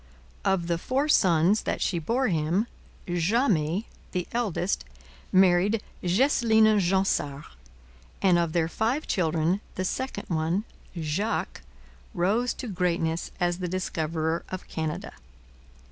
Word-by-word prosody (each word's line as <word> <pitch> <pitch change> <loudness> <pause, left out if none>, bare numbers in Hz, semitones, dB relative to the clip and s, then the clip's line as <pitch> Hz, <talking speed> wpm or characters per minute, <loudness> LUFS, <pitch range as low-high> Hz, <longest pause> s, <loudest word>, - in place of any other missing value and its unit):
Of 190 -3 +1
the 170 -1 -1
four 270 - 0
sons 185 - +4
that - - -2
she 175 - 0
bore 240 - 0
him, 170 +4 +1 0.4
Jamet, 175 - +1 0.3
the 180 -2 -1
eldest, 200 - -1 0.5
married 190 +3 +4 0.2
Geseline 220 +1 +4
Jansart, 175 -6 +1 0.8
and 180 -3 +4
of 170 -2 0
their 165 -2 +2
five 230 - -1
children 170 +1 +1
the 185 - -2
second 260 0 -3
one, 165 +4 0 0.3
Jacques, 165 +7 -2 0.5
rose 210 +8 +1
to 250 - -6
greatness 170 -4 -1
as 175 0 0
the 180 - -2
discoverer 165 -2 -2
of 185 -1 -6
Canada. 160 -2 -4
180 Hz, 115 wpm, -27 LUFS, 165-210 Hz, 0.8 s, sons